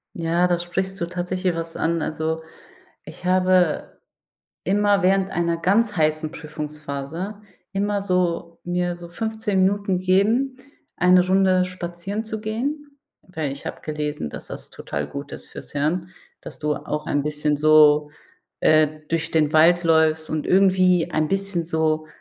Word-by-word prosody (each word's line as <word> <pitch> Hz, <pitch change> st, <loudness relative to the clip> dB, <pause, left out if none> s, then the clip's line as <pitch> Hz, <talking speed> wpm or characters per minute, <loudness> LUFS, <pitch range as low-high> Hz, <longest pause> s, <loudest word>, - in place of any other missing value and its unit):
Ja, 170 Hz, +1 st, +1 dB
da 175 Hz, -1 st, +1 dB
sprichst 190 Hz, +3 st, -3 dB
du 170 Hz, -, 0 dB
tatsächlich 180 Hz, 0 st, -2 dB
was 165 Hz, 0 st, -5 dB
an. 165 Hz, 0 st, 0 dB
Also, 160 Hz, +1 st, -2 dB, 0.6 s
ich -, -, -12 dB
habe 185 Hz, -2 st, +2 dB, 0.6 s
immer 205 Hz, +1 st, +2 dB
während 190 Hz, +1 st, +2 dB
einer 170 Hz, -1 st, 0 dB
ganz 205 Hz, +5 st, +2 dB
heißen 155 Hz, -1 st, +1 dB
Prüfungsphase 150 Hz, +5 st, -6 dB, 0.3 s
immer 205 Hz, +1 st, 0 dB
so 180 Hz, -3 st, -1 dB
mir 175 Hz, 0 st, -1 dB
so 175 Hz, -, -10 dB
15 220 Hz, +1 st, -1 dB
Minuten 195 Hz, -1 st, +1 dB
gegeben, 220 Hz, +9 st, +2 dB, 0.4 s
eine 180 Hz, 0 st, +5 dB
Runde 185 Hz, 0 st, +3 dB
spazieren 180 Hz, +3 st, -5 dB
zu 220 Hz, -1 st, -5 dB
gehen, 280 Hz, +6 st, -4 dB, 0.2 s
weil 160 Hz, -6 st, -4 dB
ich 140 Hz, -, -9 dB
habe -, -, -5 dB
gelesen, 150 Hz, -, -3 dB
dass -, -, -8 dB
das -, -, -8 dB
total 75 Hz, 0 st, -5 dB
gut 140 Hz, -, -7 dB
ist -, -, -8 dB
fürs -, -, -10 dB
Hirn, 165 Hz, +5 st, -1 dB, 0.3 s
dass -, -, -10 dB
du 150 Hz, -1 st, 0 dB
auch 150 Hz, 0 st, -4 dB
ein 145 Hz, -1 st, 0 dB
bisschen 150 Hz, 0 st, 0 dB
so, 150 Hz, 0 st, +5 dB, 0.5 s
äh, 155 Hz, -1 st, +5 dB, 0.2 s
durch 165 Hz, 0 st, -2 dB
den 155 Hz, -1 st, +2 dB
Wald 175 Hz, +3 st, +5 dB
läufst 160 Hz, -1 st, +3 dB
und 155 Hz, -1 st, -2 dB
irgendwie 185 Hz, -2 st, +4 dB
ein 155 Hz, -1 st, 0 dB
bisschen 195 Hz, -3 st, 0 dB
so 160 Hz, -1 st, 0 dB
175 Hz, 150 wpm, -23 LUFS, 155-190 Hz, 0.6 s, eine